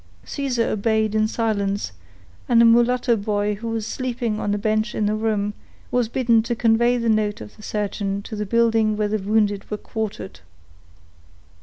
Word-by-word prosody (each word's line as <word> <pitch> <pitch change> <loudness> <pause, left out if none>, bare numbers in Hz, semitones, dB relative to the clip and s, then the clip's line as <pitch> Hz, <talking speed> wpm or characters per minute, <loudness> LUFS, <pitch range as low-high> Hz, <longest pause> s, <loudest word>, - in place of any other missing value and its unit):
Caesar 255 -5 -1
obeyed 220 0 +1
in 215 0 +2
silence, 205 - -1 0.6
and 235 -2 +5
a 235 - +7
mulatto 240 +1 +4
boy 205 0 -1
who 215 +3 -6
was 225 -1 -2
sleeping 240 -3 -2
on 205 - -1
a 205 - +1
bench 215 +2 0
in 215 - 0
the 210 - +1
room, 215 -1 -1 0.4
was 245 -2 +1
bidden 235 -2 +3
to 235 +2 -2
convey 235 +2 +3
the 235 -1 -1
note 215 -2 +1
of 105 - -10
the - - -15
surgeon 200 -1 -2
to 220 - -7
the 210 - -2
building 225 -1 +2
where 210 -1 +1
the 215 +1 0
wounded 205 0 0
were 210 - -2
quartered. 210 - -5
220 Hz, 175 wpm, -22 LUFS, 210-230 Hz, 0.6 s, a